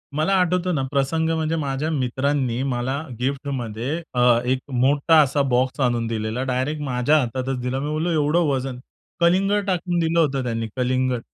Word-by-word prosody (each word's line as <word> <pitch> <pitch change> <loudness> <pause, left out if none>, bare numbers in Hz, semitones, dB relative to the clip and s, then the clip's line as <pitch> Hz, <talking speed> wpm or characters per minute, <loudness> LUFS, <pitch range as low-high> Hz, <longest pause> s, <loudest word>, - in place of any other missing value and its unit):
मला 155 +6 +1
आठवतं 180 -1 +1
ना, 135 - 0
प्रसंग 150 +4 0
म्हणजे 160 0 -1
माझ्या 145 0 -2
मित्रांनी 130 -2 0
मला 125 +2 -1 0.2
गिफ्टमध्ये 135 +1 -3
अ, 125 -1 +4
एक 130 +1 +1
मोठा 140 +5 +3
असा 140 0 +1
बॉक्स 130 +3 +1
आणून 120 -2 +1
दिलेला 110 +2 -2
डायरेक्ट 130 +4 -2
माझ्या 130 +2 +2
हातातच 130 0 -2
दिला. 125 +2 -2
मी 145 +2 -3
बोललो 155 +3 -1
एवढं 155 +1 +2
वजन 130 -2 -2 0.4
कलिंगड 195 +4 +2
टाकून 180 -2 0
दिलं 165 0 +1
होतं 140 -4 +1
त्यांनी 115 -2 -2
कलिंगड. 130 -1 0
135 Hz, 160 wpm, -22 LUFS, 125-155 Hz, 0.4 s, अ